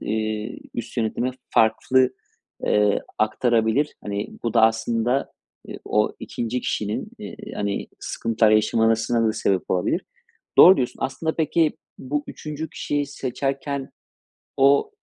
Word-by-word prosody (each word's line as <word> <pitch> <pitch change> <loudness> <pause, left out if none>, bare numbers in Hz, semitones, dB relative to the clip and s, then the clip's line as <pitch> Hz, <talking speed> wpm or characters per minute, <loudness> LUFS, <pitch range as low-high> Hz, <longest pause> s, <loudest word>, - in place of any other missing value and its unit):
eee, 110 0 -3 0.2
üst 120 - -6
yönetime 120 +2 0 0.2
farklı, 125 +3 +3 0.5
eee, 105 -1 +3 0.2
aktarabilir. 115 +5 +1
Hani, 100 0 -3 0.2
bu 115 -1 -1
da 115 - +5
aslında, 115 +3 +1 0.3
eee, - - -8
o 105 0 +1
2'nci 120 +2 -3
kişinin, 105 -3 -2
eee, - - -8 0.2
hani, 100 -1 -2
sıkıntılar 115 -1 +1
yaşamasına 115 +1 +3
da - - +1
sebep 95 -3 -1
olabilir. 90 -1 +1 0.6
Doğru 185 -1 +10
diyorsun. 125 -3 -2
Aslında 160 +5 -2
peki, 160 0 +1 0.2
bu 145 +3 -3
3'üncü 155 +1 -6
kişiyi 145 -1 -2
seçerken 135 +1 -3 0.7
o, 140 - +4
115 Hz, 120 wpm, -23 LUFS, 110-135 Hz, 0.7 s, Doğru